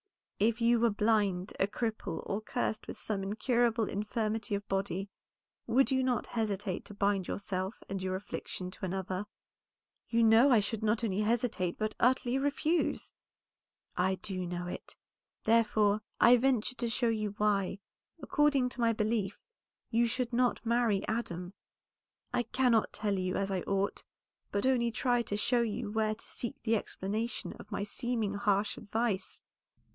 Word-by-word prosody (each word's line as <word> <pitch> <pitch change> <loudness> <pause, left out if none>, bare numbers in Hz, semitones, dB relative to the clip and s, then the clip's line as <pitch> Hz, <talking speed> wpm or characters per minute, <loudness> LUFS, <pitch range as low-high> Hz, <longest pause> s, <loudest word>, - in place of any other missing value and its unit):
"If 225 +3 +2
you 235 0 +4
were 235 0 +4
blind, 205 -3 +1
a 195 - +3
cripple, 215 -5 -3
or 200 +2 -2
cursed 220 0 -2
with - - -6
some 205 -3 -2
incurable 230 +2 +1
infirmity 215 +1 -1
of 200 0 -5
body, 195 0 -1 0.6
would 260 +4 +3
not 260 -3 +1
you - - -16
hesitate 210 -4 -1
to 205 - -10
bind 200 -2 +1
yourself 190 0 -3
and 195 -1 -4
your 185 0 -1
affliction 185 -1 -5
to 195 - -13
another?" 190 +1 -3 0.8
"You 230 0 +3
know 225 +5 +7
I 240 -4 +6
should 210 +1 -2
not 220 +2 +1
only 200 -3 0
hesitate, 215 -5 0
but 215 0 -1
utterly 255 +1 +3
refuse." 295 +4 0 0.8
"I 190 +1 +2
do 185 -2 -4
know 175 0 -3
it, 180 - -7 0.5
therefore 215 -2 +3 0.2
I 240 +1 +8
venture 250 -1 +1
to 240 -1 -2
show 235 +1 +1
you 215 -2 -1
why, 200 -2 +1 0.4
according 280 -2 +2
to 250 - -6
my 230 -1 +4
belief, 215 -2 -1 0.5
you 235 0 +3
should 245 +1 -2
not 245 0 +1
marry 230 -4 +2
Adam. 180 -5 -3 0.8
I 245 - +3
cannot 240 -1 +2
tell 205 -2 -1
you 185 0 -1
as 195 0 -1
I 185 -2 0
ought, 195 +2 -1 0.5
but 200 +3 0
only 245 -3 +3
try 245 +1 +1
to 205 -3 -3
show 240 +3 +2
you 220 -1 -2
where 215 0 +1
to - - -14
seek 240 - -4
the 225 0 +2
explanation 215 +3 -3
of 210 - -12
my 200 - -2
seeming 225 -1 -1
harsh 200 0 +1
advice. 220 -1 -1
215 Hz, 160 wpm, -32 LUFS, 200-235 Hz, 0.8 s, I